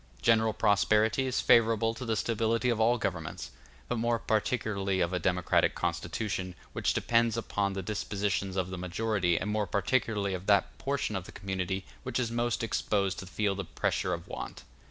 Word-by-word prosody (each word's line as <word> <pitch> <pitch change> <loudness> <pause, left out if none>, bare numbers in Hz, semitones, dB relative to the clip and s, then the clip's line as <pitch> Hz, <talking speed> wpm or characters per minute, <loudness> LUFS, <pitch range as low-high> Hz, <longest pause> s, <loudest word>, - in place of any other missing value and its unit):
General 110 -1 +4
prosperity 110 +4 +3
is 130 - 0
favorable 115 -1 +4
to 125 +2 -7
the 115 -1 0
stability 115 +2 +1
of 115 - -1
all 120 +2 +4
governments, 90 - -4 0.4
but 125 - -1
more 115 +1 +2
particularly 105 -4 0
of 85 0 +1
a 90 - +1
democratic 90 +1 +2
constitution, 95 -4 -2 0.2
which - - 0
depends 115 -1 +2
upon 100 -3 -1
the 95 0 -4
dispositions 100 -1 -2
of 95 -1 -1
the 95 - -5
majority, 90 -1 0
and 105 - -2
more 105 -1 0
particularly 100 -1 0
of 95 +1 -5
that 100 -2 +3
portion 135 -6 -1
of 95 -2 -3
the - - -10
community 95 -1 -3 0.2
which - - -3
is 120 -2 -1
most 120 0 0
exposed 100 -4 0
to 95 - -8
feel 100 +1 0
the 100 0 -4
pressure 90 +2 -1
of 85 0 -11
want. - - -7
105 Hz, 175 wpm, -30 LUFS, 95-115 Hz, 0.4 s, General